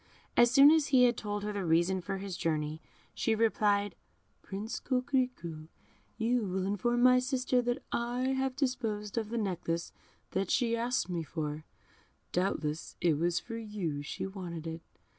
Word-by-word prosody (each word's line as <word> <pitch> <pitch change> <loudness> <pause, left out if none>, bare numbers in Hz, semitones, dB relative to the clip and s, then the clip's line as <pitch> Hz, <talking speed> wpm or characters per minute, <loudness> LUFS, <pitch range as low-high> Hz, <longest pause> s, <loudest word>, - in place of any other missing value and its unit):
As 240 0 +6
soon 275 +4 +8
as 315 -2 +4
he 260 -4 +5
had 245 -1 +5
told 205 -1 -3
her 210 0 -2
the 200 -1 -2
reason 175 +3 +2
of 190 +2 -4
his 195 -2 -4
journey, 155 -2 -1 0.3
she 225 - +1
replied, 205 -3 +2 0.5
"Prince 210 +4 -5
Coquerico, 250 - -1 0.5
you 235 +2 +1
will 190 -1 -1
inform 240 +5 +1
my 255 0 +7
sister 255 -1 +1
that 245 0 -2
I 245 +2 0
have 265 -1 0
disposed 225 -7 -2
of 225 -2 -1
the 235 - -2
necklace 175 -5 -2 0.4
that 190 -1 -1
she 235 -2 +2
asks 240 -2 0
me 175 -2 -2
for; 155 -1 -4 0.7
doubtless 165 -4 -1
it 160 -4 +2
was 170 +1 +1
for 230 -1 -7
you 205 -10 -3
she 145 - -5
wanted 180 -4 -6
it. 165 0 -5
205 Hz, 160 wpm, -31 LUFS, 175-245 Hz, 0.7 s, soon